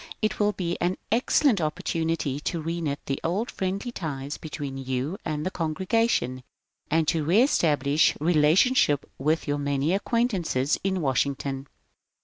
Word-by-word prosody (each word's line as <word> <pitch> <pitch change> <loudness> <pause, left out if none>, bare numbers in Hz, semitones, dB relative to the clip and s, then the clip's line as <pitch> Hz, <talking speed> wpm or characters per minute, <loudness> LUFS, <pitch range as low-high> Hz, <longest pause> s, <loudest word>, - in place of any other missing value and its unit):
It 215 - -1
will 210 0 +2
be 175 -3 -3
an 180 +2 +1
excellent 235 - +3
opportunity 160 -2 -1
to 165 +3 -3
reknit 165 -3 -2
the 135 - -2
old 195 +9 -1
friendly 195 +5 -3
ties 145 - -5
between 145 -3 -6
you 130 - -3
and 155 -2 -3
the 185 - -1
congregation 170 - 0 0.5
and 160 0 +2
to 160 -1 +1
rees 215 - +4
tablish 145 -2 +3
relationship 155 - +3
with 155 +4 0
your 145 0 0
many 140 +3 0
acquaintances 195 - 0
in 190 -1 0
Wash 135 -4 +2
ington. 140 -1 -4
160 Hz, 140 wpm, -26 LUFS, 140-190 Hz, 0.5 s, rees